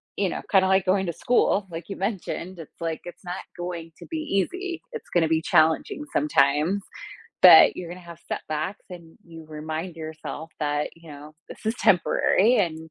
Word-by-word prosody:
you 195 -2 0
know, - - -4
kinda, 190 -1 +4
like, 190 -1 +3
going 190 0 +1
to 170 - -2
school, 205 -1 +1
like 170 +3 -8
you 195 - -5
mentioned, 190 -2 -4
it's 160 - -12
like, 165 -1 -3
it's 175 +2 -11
not 175 0 -4 0.2
going 175 -2 -6
to - - -10
be 325 - -3
easy. 335 - -2
It's 460 - -8
gonna 170 -2 +2
be 160 0 +1
challenging 160 - +2
sometimes. 170 - +2 0.6
But - - +9
you're 175 - -6
gonna 180 +1 -8
have 170 -1 -12
setbacks 155 +5 -4
and 170 -2 -11
you 165 -1 -12
remind 155 +3 -5
yourself 160 0 -7
that, 145 -1 -1
you 165 -1 -14
know, 150 +2 -12
this - - -12
is 220 +1 0
temporary 200 +4 +3
and 160 -5 -1
175 Hz, 180 wpm, -25 LUFS, 160-195 Hz, 0.6 s, But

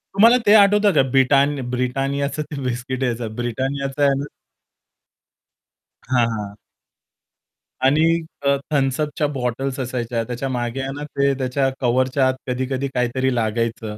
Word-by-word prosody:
तुम्हाला 230 +5 +6
ते 205 - +6
आठवतं 205 -1 +5
का? 150 - +5
ब्रिट 135 +1 +3 0.4
BRITANNIAचं 135 +4 -1
ते 140 - -5
बिस्किट 125 +1 -3
यायचा 120 -1 -1 0.2
BRITANNIAचं 135 +4 -3
आहे 140 -1 +4
ना. 140 - -3 1.8
हां, 125 -2 +3
हां. 100 -1 -6 1.3
आणि 145 +4 +4 0.4
अ, 140 - +4 0.2
Thums 135 -1 +1
Up 150 0 -2
बॉटल्स 130 +1 -3
असायच्या 120 -2 -2
त्याच्या 125 +3 -4
मागे 120 0 -3
आहे 135 - -4
ना, 145 - -6
ते 140 -1 0
त्याच्या 135 +1 0
कव्हरच्या 130 +2 +2
आत 130 - +2
कधी-कधी 130 +2 -2
काहीतरी 125 +2 0
लागायचं. 110 -1 -2
130 Hz, 135 wpm, -21 LUFS, 125-140 Hz, 1.8 s, तुम्हाला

